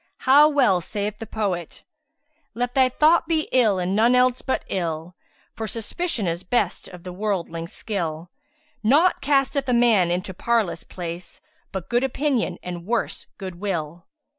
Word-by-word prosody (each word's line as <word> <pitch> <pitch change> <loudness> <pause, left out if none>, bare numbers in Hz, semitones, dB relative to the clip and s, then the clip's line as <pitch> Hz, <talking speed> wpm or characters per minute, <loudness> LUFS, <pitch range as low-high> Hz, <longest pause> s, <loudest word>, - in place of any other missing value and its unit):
How 285 +3 +7
well 250 -12 +3
saith 210 +3 -4
the 225 - -7
poet, 190 -7 -3 0.7
'Let 245 +1 -2
thy 260 -1 +4
thought 315 +5 +3
be 320 -2 0
ill 225 -6 +4
and 185 +1 -1
none 235 +4 +4
else 250 0 +3
but 260 - -2
ill; 165 -1 -3 0.2
* - - -37
For 220 - -4
suspicion 230 - -2
is 170 0 -1
best 205 -2 -1
of 180 -1 -12
the 180 -1 -7
worldling's 180 -4 -3
skill: 170 -5 -4 0.5
Naught 295 +11 +4
casteth 275 -1 +1
a - - +3
man 230 -7 +4
into 180 +2 -2
parlous 215 -4 0
place 175 -1 -7 0.2
* - - -41
But 190 -3 -5
good 240 +1 +1
opinion 270 -1 0
and 175 -1 -6
(worse) 235 0 -2
good 185 -3 -7
will!' 170 -4 -4
210 Hz, 165 wpm, -23 LUFS, 180-255 Hz, 0.7 s, How